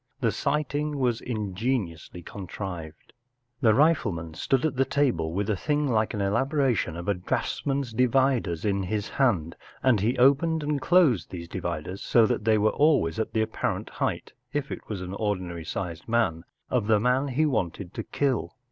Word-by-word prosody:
The - - +2
sight¬ 150 -2 -1
ing 150 0 -1
was 125 -4 0
ingeniously 100 -6 -3
contrived* 90 -5 -7 0.5
The 110 - +5
rifle¬ 145 -3 +3
man 80 -1 -6
stood 130 - 0
at 155 - 0
the 135 - +3
table 125 - 0
with 100 +4 -1
a 105 - +1
thing 150 +7 0
like 110 -2 +1
an 105 - -2
elaboration 120 - +1
of 85 - -7
a 100 - +3
draughtsman's 135 +7 -2
dividers 125 -8 +2
in 100 -1 +1
his 100 +2 -2
hand, 95 - +1 0.3
and 130 -5 +4
he 115 +6 0
opened 150 +5 +4
and 145 -1 -1
closed 135 - +4
these 85 -2 -7
dividers, 85 +1 -4
so 115 -2 +4
that 105 - -1
they 110 -1 +4
were 105 +1 +3
always 140 - +2
at 110 - -2
the 110 - +2
apparent - - -3
height—if 145 0 -4
it - - -7
was 100 -4 -4
an 90 +1 -6
ordinary 95 -5 -2
sized 85 0 -5
man—of 110 +1 -1
the 110 -1 +4
man 125 +5 +2
he 140 +4 +1
wanted 95 - -2
to - - -3
kill. 135 -6 -1
110 Hz, 175 wpm, -26 LUFS, 90-135 Hz, 0.5 s, The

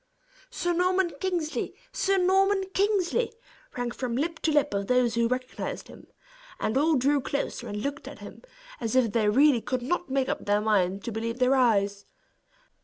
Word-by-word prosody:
"Sir 350 -8 -1
Norman 365 +1 +2
Kingsley! 350 -4 -2 0.2
Sir 390 0 +1
Norman 385 +2 +3
Kingsley!" 410 +3 +1 0.5
rang 245 -1 -2
from 240 -1 -3
lip 320 +5 -2
to 320 - +1
lip 295 -7 +2
of 200 0 -2
those 250 -2 +2
who 235 0 +2
recognized 255 +1 -4
him; - - -14 0.5
and 215 - -1
all 305 +4 +3
drew 280 +2 +2
closer, 280 +2 -3
and 210 0 -4
looked 285 +1 -4
at - - -8
him - - -11 0.4
as 230 0 -2
if 245 -4 +3
they 215 -2 +2
really 265 +2 +4
could 255 +1 -3
not 350 +5 -2
make 265 0 0
up - - -2
their 205 0 +2
mind 200 -3 +1
to 235 - -4
believe 230 +2 -3
their 255 +1 +3
eyes. 200 -6 +2
260 Hz, 180 wpm, -27 LUFS, 230-345 Hz, 0.5 s, really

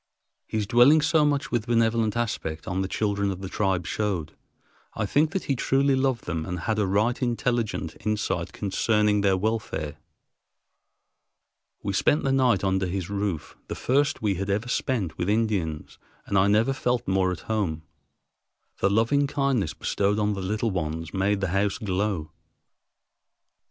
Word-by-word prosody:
His 110 -1 -1
dwelling 125 +8 +6
so 155 +1 +3
much 145 -1 0
with 120 -3 -1
benevolent 115 -1 +2
aspect 85 -9 -3
on 95 +1 -1
the 95 - -1
children 100 0 0
of 95 -1 -4
the 95 - -4
tribe 95 -3 0
showed, 90 -3 -2 0.6
I - - -1
think, 150 +9 +2
that 190 - -2
he 140 - 0
truly 135 +2 +2
loved 130 -3 0
them 85 -2 -2
and 90 +1 -4
had 110 +4 -1
a 105 - +1
right 105 +7 +1
intelligent 120 -7 -1
insight 105 +1 -1
concerning 105 +1 +1
their 95 -1 +3
welfare. 95 -8 -2 1.9
We - - -2
spent 150 - +2
the 135 - +1
night 125 -7 +3
under 95 -1 +1
his 95 +1 -4
roof, 100 -6 -3
the - - -4
first 145 +1 +1
we 105 -2 +2
had 100 +2 -4
ever 105 +4 0
spent 115 - -1
with 90 +2 0
Indians, 100 -8 -1 0.3
and 100 - -3
I 95 +1 +5
never 110 +6 +3
felt 125 -2 -1
more 95 -1 +2
at 90 - -5
home. 95 -8 -2 1.0
The 95 - +3
loving 115 +8 +2
kindness 135 - 0
bestowed 100 +1 0
on 105 0 +1
the 100 - -4
little 105 +4 -1
ones 80 -2 -3
made 100 +1 +1
the 95 - 0
house 95 +2 +1
glow. 95 -5 -2
105 Hz, 160 wpm, -26 LUFS, 95-120 Hz, 1.9 s, dwelling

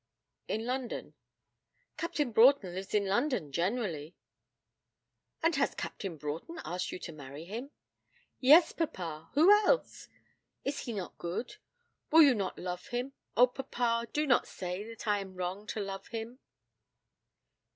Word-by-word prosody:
'In 220 +1 -2
London.' 250 0 -3 0.8
'Captain 295 -6 -1
Broughton 225 -4 +5
lives 190 +2 -4
in 205 -1 +3
London 200 - 0
generally.' 170 - -2 1.3
'And 330 -1 +3
has 275 - +1
Captain 185 -5 -5
Broughton 155 - -5
asked 180 +1 -3
you - - -4
to 175 - -7
marry 145 +1 -9
him?' 230 +9 -6 0.7
'Yes, 305 +6 +7
papa 170 - -4
who 325 +7 +7
else? 425 +4 +3 0.6
Is 280 +1 -1
he 240 - -4
not 190 -5 -6
good? 185 - -4 0.5
Will 320 +1 +8
you 280 -3 +7
not 195 -5 -2
love 180 0 -5
him? 245 +3 -3 0.2
Oh, 245 - +9
papa, 240 -2 -1
do 300 +1 +1
not 245 -5 +3
say 180 +2 -5
that 230 0 -9
I 205 -1 +3
am 190 -1 -8
wrong 185 +3 -4
to 220 - -3
love 195 -1 -5
him?' 230 +2 -6
220 Hz, 140 wpm, -31 LUFS, 180-265 Hz, 1.3 s, Oh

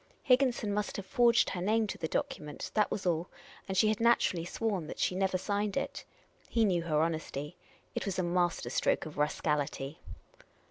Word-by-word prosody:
Higginson 250 -5 +3
must 210 0 -2
have 200 - -5
forged 235 +3 +4
her 180 - -3
name 220 +4 +2
to 205 - -5
the 160 - -1
document; 150 -1 -3
that 210 -1 +3
was 195 - -3
all; 170 0 0 0.4
and 190 -1 -2
she 215 - +5
had 215 - 0
naturallj' 230 -7 +3
sworn 195 -5 -2
that - - -7
she - - +1
never 190 0 +1
signed 205 +1 -1
it. - - -3 0.4
He 230 -1 +3
knew 180 -4 +2
her 155 -2 +1
honesty. 155 -3 -3 0.4
It - - -3
was 190 - -2
a 185 - +1
master 175 0 0
stroke - - +1
of 155 -1 -8
rascality. 150 0 -1
185 Hz, 185 wpm, -31 LUFS, 165-210 Hz, 0.4 s, she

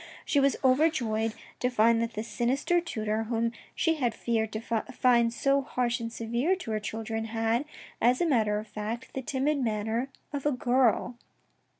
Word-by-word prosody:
She 285 - +2
was 275 0 +3
over 265 +5 +5
joyed 225 -5 -1 0.2
to 250 - +1
find 230 -1 +4
that 230 0 -2
this 215 +2 -4
sinister 270 +10 +1
tutor, 220 -8 -2
whom 230 0 0 0.2
she 325 -1 +1
had 245 -5 0
feared 220 -2 -1
to 215 - -2
find 235 +1 +2
so 275 +3 +2
harsh 250 -2 -1
and 230 0 -4
severe 235 +10 0
to 360 -12 -6
her 215 - 0
children, 225 +1 -4
had, 225 +3 0 0.4
as 245 +2 +4
a 350 - +2
matter 220 -9 +2
of 215 +1 -5
fact, 215 +4 -5
the 265 - -3
timid 280 +3 0
manner 225 +1 -1 0.2
of 285 0 -1
a - - +3
girl. 250 -2 +2
235 Hz, 180 wpm, -28 LUFS, 225-265 Hz, 0.4 s, over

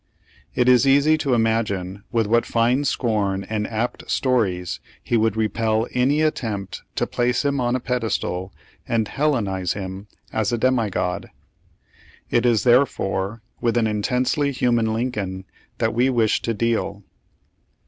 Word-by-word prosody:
It 125 - +2
is 125 +1 +5
easy 145 +3 +5
to 135 -4 +1
imagine 100 -4 -1
with 115 -2 +2
what 115 +3 +3
fine 120 +5 +1
scorn 100 -7 0
and 105 0 -2
apt 115 +2 -3
stories 100 -9 0 0.2
he - - 0
would 110 -1 +2
repel 110 0 +1
any 140 +5 +2
attempt 105 -10 -2
to - - +1
place 125 +3 0
him 140 -2 +1
on 120 0 +1
a - - 0
pedestal 110 -7 -2 0.4
and 115 -2 +1
Hellenize 105 - 0
him 95 0 -6 0.3
as 110 0 0
a 120 - +1
demigod. 110 -7 0 1.0
It 120 +1 +3
is 115 -3 +3
therefore 115 -4 +1 0.2
with 120 -1 +1
an 115 - +3
intensely 125 +7 0
human 120 -4 +1
Lincoln 105 -5 -3 0.3
that - - 0
we 125 +3 +3
wish 115 -4 +2
to 115 - -2
deal. 110 -2 -1
115 Hz, 140 wpm, -22 LUFS, 105-125 Hz, 1.0 s, is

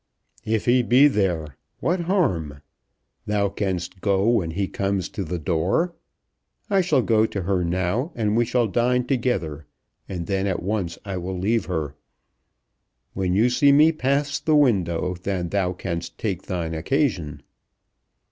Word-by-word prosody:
"If 110 -1 0
he 125 +1 +4
be 125 +4 +5
there, 85 - -1 0.2
what 175 +3 0
harm? 95 - -1 0.6
Thou 100 -1 +1
canst 95 -2 -3
go 100 0 +2
when 110 -8 +2
he 95 +4 -2
comes 100 -1 -2
to 100 - -4
the 90 +1 -3
door. 90 - 0 0.8
I 195 -1 +4
shall 150 -8 +2
go 110 -1 +3
to 100 -4 -4
her 95 0 0
now, 95 - -1
and 110 -2 0
we 120 - +4
shall 120 0 +1
dine 120 +4 +1
together, 115 - -1 0.4
and 90 -3 -4
then 95 +1 -1
at 95 -3 -2
once 95 -4 -2
I 95 -2 -4
will 90 +1 -4
leave 110 +5 0
her. 80 -6 -3 1.2
When 95 -1 -1
you 110 +5 +4
see 140 +3 +4
me 150 +3 +6
pass 145 -1 0
the 155 - +2
window 90 - +2
then 90 -3 -2
thou 95 -2 0
canst 85 -2 -5
take 95 -5 -3
thine 85 -3 -3
occasion." 85 - -1
100 Hz, 155 wpm, -23 LUFS, 90-125 Hz, 1.2 s, me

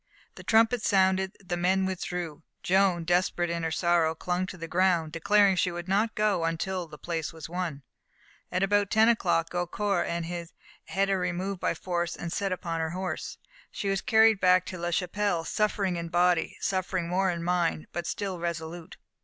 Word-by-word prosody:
The - - -11
trumpets 225 0 +3
sounded; 190 -1 +2
the 175 - -2
men 185 +2 +2
withdrew, 180 -4 -4 0.2
Joan, 185 -2 +3
desperate 175 0 +1
in 170 0 -2
her 165 - -1
sorrow, 170 -1 +2
clung 180 +3 -2
to 185 - -8
the 165 -1 -6
ground, 175 -2 +2
declaring 200 +4 +3
she 180 - +1
would 175 +1 -6
not 210 +4 +1
go 210 -5 +1
until 170 +2 -2
the 150 - -11
place 165 -2 -3
was 160 -2 -9
won. 165 -5 -4 0.7
At 185 +2 0
about 205 0 +2
ten 220 +1 +5
o'clock 175 -7 +1
Gaucourt 180 +3 -1
had 170 +3 -4
her 195 -1 +1
removed 180 +2 -2
by - - 0
force 175 -2 -2
and 170 -1 -5
set 200 -1 -1
upon 170 -2 -3
her 160 0 -1
horse. 185 0 -4 0.3
She 200 - -3
was 195 0 0
carried 220 -2 +5
back 185 -1 +4
to 185 - -6
La 175 0 -2
Chapelle, 180 0 0
suffering 200 -3 0
in 170 0 -4
body, 175 0 +2
suffering 185 -2 -1
more 190 +2 +1
in 170 -1 -3
mind, 175 -2 0
but 175 0 -4
still 195 -3 -3
resolute. 170 0 -5
180 Hz, 180 wpm, -28 LUFS, 170-195 Hz, 0.7 s, ten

